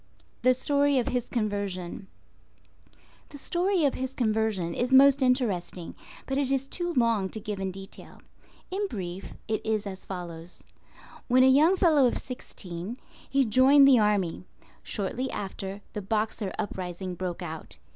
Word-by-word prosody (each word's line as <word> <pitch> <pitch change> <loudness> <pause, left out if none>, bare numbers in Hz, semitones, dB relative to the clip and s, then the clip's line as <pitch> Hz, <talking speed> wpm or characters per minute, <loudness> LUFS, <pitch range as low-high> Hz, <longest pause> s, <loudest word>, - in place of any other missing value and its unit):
THE 255 +1 +4
STORY 285 +1 +2
OF 245 - +1
HIS 245 -1 -2
CONVERSION. 200 -4 -3 1.2
The 290 - -10
story 355 +3 +1
of 275 - +2
his 260 +1 -4
conversion 215 -7 0
is 245 +6 -1
most 275 +1 +7
interesting, 205 -10 0 0.3
but 270 +1 -1
it 275 -2 0
is 270 0 0
too 350 +4 -2
long 230 -6 +2
to 220 - -5
give 210 -2 -5
in 190 0 -2
detail. 195 +1 -11 0.5
In 400 +2 -1
brief, 185 - -6
it 220 -1 -1
is 220 -1 -1
as 190 -1 -7
follows:—When 180 +7 -3
a - - +7
young 300 +8 +5
fellow 310 -8 +5
of - - 0
sixteen, 195 -4 -7 0.3
he 275 -1 +3
joined 265 +5 +6
the 260 -3 +7
army. 200 -5 +1 0.4
Shortly 235 +6 -3
after, 195 0 -5
the 210 - -4
Boxer 210 0 -1
Uprising 185 -1 -4
broke 180 -1 -4
out. 155 - -6
220 Hz, 145 wpm, -27 LUFS, 190-265 Hz, 1.2 s, most